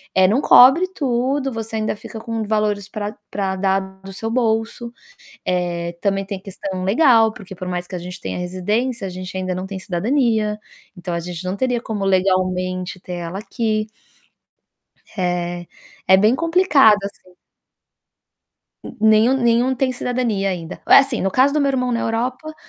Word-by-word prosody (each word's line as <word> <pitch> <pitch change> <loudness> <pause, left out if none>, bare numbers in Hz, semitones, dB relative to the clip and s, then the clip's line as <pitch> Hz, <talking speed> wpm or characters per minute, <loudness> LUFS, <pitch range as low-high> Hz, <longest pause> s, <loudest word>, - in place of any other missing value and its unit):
eh, 190 0 +5
não 235 +6 +2
cobre 270 +9 +7
tudo, 265 +1 0
você 225 -1 -5
ainda 215 0 -1
fica 220 - -10
com 225 0 -4
valores 210 -2 -1
pra 210 0 -5 0.2
pra 190 -2 -2
dar 195 0 +1 0.2
do 195 0 -9
seu 225 +3 -4
bolso. 230 0 -1 0.5
Eh, 175 -1 -2
também 195 -1 0
tem 200 -1 -4
a - - -21
questão 190 -2 -5
legal, 225 0 +4
porque 190 -3 -11
por 185 0 -7
mais 180 0 -3
que - - -9
a - - -4
gente 180 0 -8
tenha - - -4
residência, 205 +6 -2
a - - -5
gente 185 +1 -8
ainda 185 -1 -2
não 185 +1 -4
tem 195 -1 -6
cidadania, 215 +2 0 0.4
então 175 0 -5
a 170 - -1
gente 175 +1 -7
não 185 +2 -3
teria 245 0 0
como, 210 -4 -4
legalmente, 185 -1 0
ter 180 - -7
ela 175 +2 -5
aqui. 215 -1 -2 1.3
Eh, 175 -1 -2 0.4
é 190 - +7
bem 215 +5 +4
complicado, 320 - +4
assim. 185 -2 -10 1.5
N - - -8
nenhum 220 +4 +5
nenhum 240 +2 +3
tem 255 +1 0
cidadania 240 -6 -1
ainda. 170 -3 -6
Assim, 275 -3 +5
no 195 - 0
caso 270 +2 +4
do 300 - +1
meu 280 - +2
irmão 250 -2 0
na 230 - 0
Europa, 250 +7 -3
210 Hz, 170 wpm, -20 LUFS, 185-240 Hz, 1.5 s, cobre